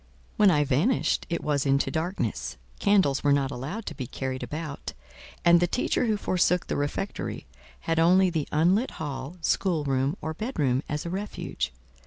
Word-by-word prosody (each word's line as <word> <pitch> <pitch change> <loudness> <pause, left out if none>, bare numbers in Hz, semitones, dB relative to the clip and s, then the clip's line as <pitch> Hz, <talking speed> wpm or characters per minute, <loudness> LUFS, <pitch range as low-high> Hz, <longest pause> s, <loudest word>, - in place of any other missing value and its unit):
When 210 -3 +6
I 150 -5 +4
vanished—it 170 - +1
was 145 -2 +1
into 140 0 +2
darkness; 160 - -2 0.2
candles 190 -10 +3
were 145 - +4
not 140 -1 +2
allowed 150 - -5
to - - -5
be 130 -4 -5
carried 130 0 -4
about, 150 -2 -5 0.5
and 170 0 +7
the 175 - +2
teacher 250 +4 0
who 215 -1 +2
forsook 180 -2 +1
the - - -2
refectory, 145 +7 -3 0.4
had 165 0 0
only 180 +2 +5
the 160 -4 -1
unlit 180 - +2
hall, 140 +1 -5
schoolroom, 145 -6 +1
or 160 - -4
bedroom, 150 - 0
as 150 +2 -3
a 170 - -3
refuge. 195 - -3
160 Hz, 160 wpm, -27 LUFS, 140-185 Hz, 0.5 s, and